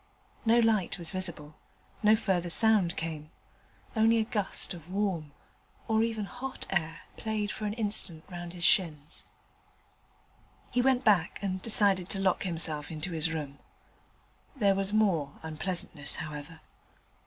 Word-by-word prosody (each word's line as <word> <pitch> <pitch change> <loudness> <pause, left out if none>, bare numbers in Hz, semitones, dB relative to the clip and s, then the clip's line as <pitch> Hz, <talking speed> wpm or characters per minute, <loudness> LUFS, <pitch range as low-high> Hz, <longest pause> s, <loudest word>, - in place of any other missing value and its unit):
No 230 +1 +5
light 220 -6 +2
was 170 -3 -1
visible; 170 -5 -4 0.4
no 215 0 +6
further 185 -5 0
sound 210 -2 +4
came: 155 -2 -5 0.7
only 225 +1 +4
a 225 - +3
gust 205 -4 -1
of 170 -1 -11
warm, 185 -6 -1 0.6
or 220 0 +2
even 225 -2 -1
hot 255 +4 -5
air 165 -4 -1 0.2
played 215 -1 -2
for 215 - -5
an 205 - -2
instant 205 -7 +2
round 175 -2 -7
his 175 -1 -4
shins. 155 -5 +1 1.5
He 245 - +2
went 260 0 +3
back 195 -7 +3
and 190 -1 -2
decided 200 -4 +1
to 195 - -2
lock 190 -2 +2
himself 160 -4 +1
into 160 +3 -5
his 165 0 -1
room. 145 -3 -5 1.0
There 205 -7 +3
was 195 0 -2
more 180 -10 +2
unpleasantness, 160 -2 -4
however. 155 +1 -7
185 Hz, 140 wpm, -29 LUFS, 160-215 Hz, 1.5 s, no